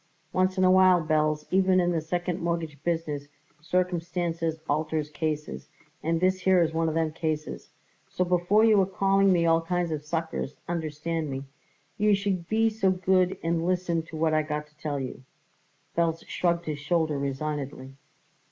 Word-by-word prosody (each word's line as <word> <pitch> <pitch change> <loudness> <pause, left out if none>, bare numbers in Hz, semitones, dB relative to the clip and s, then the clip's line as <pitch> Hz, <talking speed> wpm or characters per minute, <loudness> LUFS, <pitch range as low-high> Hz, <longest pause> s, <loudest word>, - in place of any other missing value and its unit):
Once 185 +1 +1
in 185 - +3
a 185 - +6
while, 185 -1 +6
Belz, 155 -1 +1
even 185 0 +4
in 175 -1 +2
the 165 -2 0
second 175 +2 -2
mortgage 165 -4 -3
business, 160 -4 -2 0.3
circumstances 170 -1 -1
alters 155 0 -1
cases, 150 -1 -4 0.3
and 165 +1 0
this 185 +1 +2
here 185 0 +4
is 160 -1 -1
one 165 0 +1
of 155 - -3
them 160 -1 +1
cases; 155 -2 -3 0.4
so 180 - 0
before 180 +5 +3
you 215 -3 +5
are - - +3
calling 195 +1 +3
me 170 -2 +3
all 165 0 +4
kinds 175 0 -1
of 150 -1 -3
suckers, 160 -2 -3
understand 160 -1 -3
me, 135 0 -4 0.6
you 210 0 +4
should 195 -4 -2
be 225 +1 +3
so 215 -3 +1
good 185 0 +2
and 165 0 0
listen 175 -2 0
to 160 0 -9
what 160 0 +1
I 155 - +3
got 150 0 -3
to 150 - -33
tell 145 -2 -2
you." 130 -1 -6 0.7
Belz 165 -1 0
shrugged 170 -1 0
his 150 -2 -3
shoulders 155 -1 0
resignedly. 140 -1 -4
165 Hz, 170 wpm, -27 LUFS, 155-185 Hz, 0.7 s, a